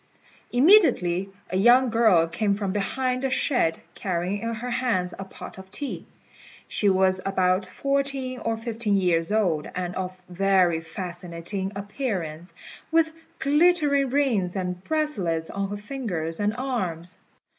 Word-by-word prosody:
Immediately 245 - +4 0.2
a 185 - 0
young 240 +4 +5
girl 220 -8 +5
came 200 +4 0
from 200 -2 -2
behind 255 +5 -1
the 270 - 0
shed, 245 - +1
carrying 185 +1 -2
in 230 0 -2
her 245 +3 -5
hands 230 -8 0
a - - -3
pot 190 - -10
of 190 0 -12
tea. 285 +7 -5 0.6
She 205 - +2
was 190 0 +3
about 185 -1 +1
fourteen 275 +3 -1
or 225 0 -1
fifteen 225 -2 -1
years 170 -2 +1
old, 180 -9 +1
and 180 -1 -3
of 185 0 -5
very 180 -2 +2
fascinating 175 +2 -5
appearance, 195 - -4 0.3
with 320 0 +2 0.2
glittering 295 -2 +3
rings 240 -10 +1
and 180 -1 -3
bracelets 195 - -1
on 200 0 -2
her 205 - -4
fingers 205 - -3
and 210 +1 0
arms. 185 -10 -3
200 Hz, 135 wpm, -25 LUFS, 180-255 Hz, 0.6 s, young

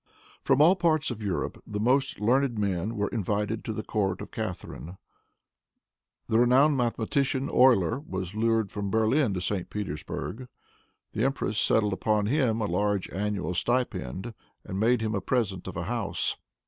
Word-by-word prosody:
From 145 - +4
all 175 +5 +6
parts 160 -5 +1
of 110 -2 -6
Europe 100 -4 -3
the 105 -1 -4
most 130 +4 +1
learned 125 +3 +2
men 100 +1 -1
were 105 -1 -1
invited 105 0 -2
to - - -2
the 110 0 -4
court 95 -3 -1
of - - -8
Catharine. 95 -4 -6 1.3
The 110 - +2
renowned 130 +5 +5
mathematician, 130 +2 0
Euler, 120 -6 +4
was 95 - -5
lured 110 -1 +1
from 100 -1 -3
Berlin 110 +2 +2
to 90 - -2
St. 90 0 -2
Petersburg. 105 - -5 0.7
The 110 - -1
empress 130 -5 0
settled 105 -2 +2
upon 105 +1 +1
him 120 -2 +1
a - - +1
large 100 +1 0
annual 100 -1 -2
stipend, 120 - -1 0.3
and 95 - -4
made 115 +2 +3
him 110 0 -1
a 100 - -1
present 100 -9 -1
of 95 - -6
a 85 - -2
house. 110 +1 -1
110 Hz, 160 wpm, -27 LUFS, 100-125 Hz, 1.3 s, all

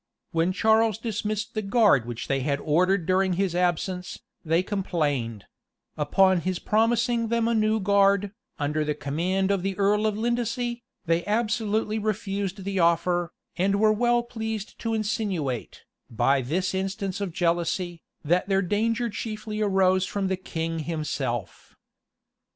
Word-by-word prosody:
When 165 +1 +1
Charles 220 +2 +3
dismissed 220 0 -3
the 215 - -1
guard 195 - +3
which 120 -1 -5
they 135 - +1
had 140 +1 -1
ordered 180 +4 +2
during 185 +1 +2
his 185 0 0
absence, 180 +1 -1 0.3
they 165 +1 +2
complained; 145 - -2 0.5
and 150 - -1
upon 190 +1 +4
his 185 +1 -1
promising 230 +3 +1
them 230 0 +1
a 235 - +2
new 215 0 +2
guard, 200 0 +3 0.3
under 150 +1 0
the 150 0 -1
command 180 +8 -1
of 200 -2 +1
the 195 0 -3
earl 210 +2 +2
of 210 -1 -1
Lindesey, 240 +1 -1 0.2
they 165 +1 +1
absolutely 220 0 0
refused 200 -2 -2
the 195 0 -2
offer, 175 +1 +2 0.3
an 195 +2 +2
were 215 +1 +4
well 240 +2 +2
pleased 220 -3 -5
to 225 -1 -1
insinuate, 195 - -2 0.3
by 135 +4 +2
this 175 +10 -1
instance 195 +1 -3
of 195 -3 -2
jealousy, 170 0 -1 0.2
that 180 +5 +1
their 195 0 +2
danger 225 +5 0
chiefly 215 0 -5
arose 190 -2 +3
from 195 -2 -2
the 190 - +1
king 165 -3 -4
himself. 145 - -4
195 Hz, 145 wpm, -26 LUFS, 170-215 Hz, 0.5 s, upon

